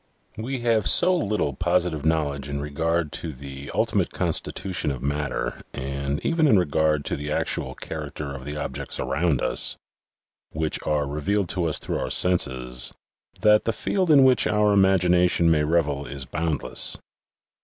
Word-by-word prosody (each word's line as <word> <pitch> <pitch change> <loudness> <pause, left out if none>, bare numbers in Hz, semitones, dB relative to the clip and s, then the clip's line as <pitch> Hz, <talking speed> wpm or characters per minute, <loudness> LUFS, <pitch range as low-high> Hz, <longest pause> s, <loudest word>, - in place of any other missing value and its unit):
We 125 +4 -4
have 115 -3 +2
so 185 0 +5
little 105 - -1
positive 85 -1 0
knowledge 75 -3 -1
in 70 0 -3
regard 80 +2 -1
to 80 - -5
the 70 0 -9
ultimate - - +1
constitution 90 -6 -2
of 65 -3 -5
matter 70 +1 -3
and 70 +1 -3
even 165 -2 +2
in 110 - +5
regard 75 -3 +1
to - - -1
the 75 +1 -5
actual - - -1
character 70 -2 -6
of 70 -1 -8
the 75 +2 -6
objects - - -4
around 70 +2 0
us, - - +4 0.8
which 80 0 -1
are 75 -1 +1
revealed 85 +7 -1
to 90 -2 -1
us 80 - 0
through - - -3
our - - -3
senses, 65 -8 +1 0.5
that 105 0 +4
the 115 - 0
field 185 - -1
in 145 -3 +7
which 130 -1 +4
our 105 -1 +2
imagin 95 -3 +3
ation 90 -1 +3
may 75 -2 +2
revel 75 -3 0
is 70 -1 -6
boundless. 80 0 +1
80 Hz, 160 wpm, -24 LUFS, 70-95 Hz, 0.8 s, in